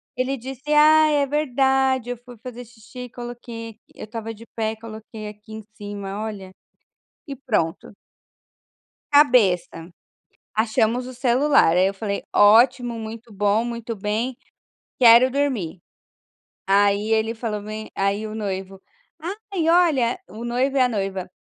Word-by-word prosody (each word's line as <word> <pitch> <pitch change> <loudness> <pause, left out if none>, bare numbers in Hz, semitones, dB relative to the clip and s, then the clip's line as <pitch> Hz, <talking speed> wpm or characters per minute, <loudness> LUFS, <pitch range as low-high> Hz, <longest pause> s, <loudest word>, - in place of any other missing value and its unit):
ele 260 +2 -1
disse: 265 +4 -7
“Ah 310 +1 +6
é 285 -1 +2
verdade 265 -3 +1
eu 245 - -4
fui 245 0 -14
fazer 245 +2 -9
xixi, 245 +2 -11
coloquei 240 -1 -8
aqui 220 - -23 0.2
eu - - -8
estava 225 0 -6
de 225 +2 -14
pé, 220 -1 -2
coloquei 220 -1 -9
aqui 210 +1 -12
em 220 0 -8
cima, 205 0 -6
olha" 200 -4 -7 0.7
e 280 -2 -7
pronto. 200 -8 -2 1.2
Cabeça, 215 - +3 0.7
achamos 225 +2 +1
o 255 - -8
celular 255 - +3
aí 185 +1 +4
eu 195 - -2
falei: 200 0 -4
"Ótimo, 235 +3 +5
muito 225 0 -8
bom, 205 +3 +1
muito 235 -1 -5
bem, 220 +5 -2 0.6
quero 240 +1 +7
dormir". 250 - -2 0.9
Aí 200 +2 +3
ele 220 +1 +1
falou 220 -2 -4
bem 215 +1 -7
aí, 195 +2 0
o 215 - -7
noivo, 195 -2 -5 0.7
"Ai 330 -4 0
olha" 320 -9 +3
o 220 +4 -8
noivo 255 +3 0
e 265 - +3
a 250 - +4
noiva, 195 -4 -3
230 Hz, 140 wpm, -22 LUFS, 210-255 Hz, 1.2 s, quero